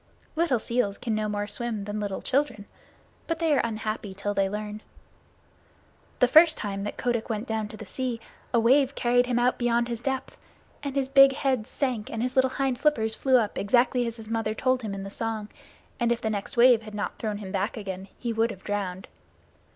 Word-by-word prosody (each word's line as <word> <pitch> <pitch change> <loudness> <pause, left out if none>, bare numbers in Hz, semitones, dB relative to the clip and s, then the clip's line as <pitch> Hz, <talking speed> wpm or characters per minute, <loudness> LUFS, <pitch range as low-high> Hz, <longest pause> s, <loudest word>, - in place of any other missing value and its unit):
Little 325 -6 +2
seals 220 -3 -1
can 230 - -3
no 215 0 -1
more 205 0 -2
swim 225 -1 -3
than 205 +1 -4
little 200 -2 -3
children, 255 -7 0 0.6
but 330 - -1
they 325 -2 +2
are 275 - +3
unhappy 215 -3 -3
till 205 +1 -2
they 195 -1 +1
learn. 210 +1 -5 1.4
The 250 - +4
first 315 +5 +7
time 200 -1 -3
that 205 - -5
Kotick 240 -2 -1
went 220 0 -2
down 220 -3 -2
to 215 0 -10
the 220 - -8
sea 250 +2 -3 0.3
a 235 - +3
wave 265 +4 +4
carried 245 0 +2
him 245 -1 0
out 245 +1 +2
beyond 240 0 +1
his 235 -1 -4
depth, 265 0 -3 0.4
and 280 -1 -4
his 275 -1 +1
big 275 0 +7
head 260 -5 0
sank 250 -6 -2
and 230 0 -3
his 250 0 -2
little 260 0 +4
hind 265 -2 -1
flippers 235 -7 +2
flew 260 +2 +3
up 215 -4 0
exactly 245 +3 +2
as 230 0 -5
his 220 -1 -10
mother 225 -1 -1
had 215 - -4
told 255 0 +1
him 210 -4 -4
in 195 - -5
the 195 - -7
song, 220 -1 -3 0.5
and 235 -1 +2
if 235 - +1
the 220 - -2
next 205 +2 -4
wave 240 -1 +7
had 215 -1 -10
not 210 - -4
thrown 215 -2 -2
him 200 -2 -7
back 200 +3 -1
again 190 -2 -6
he 235 -2 -3
would 225 +1 +2
have 195 -4 -9
drowned. 190 -3 -3
230 Hz, 215 wpm, -26 LUFS, 210-255 Hz, 1.4 s, first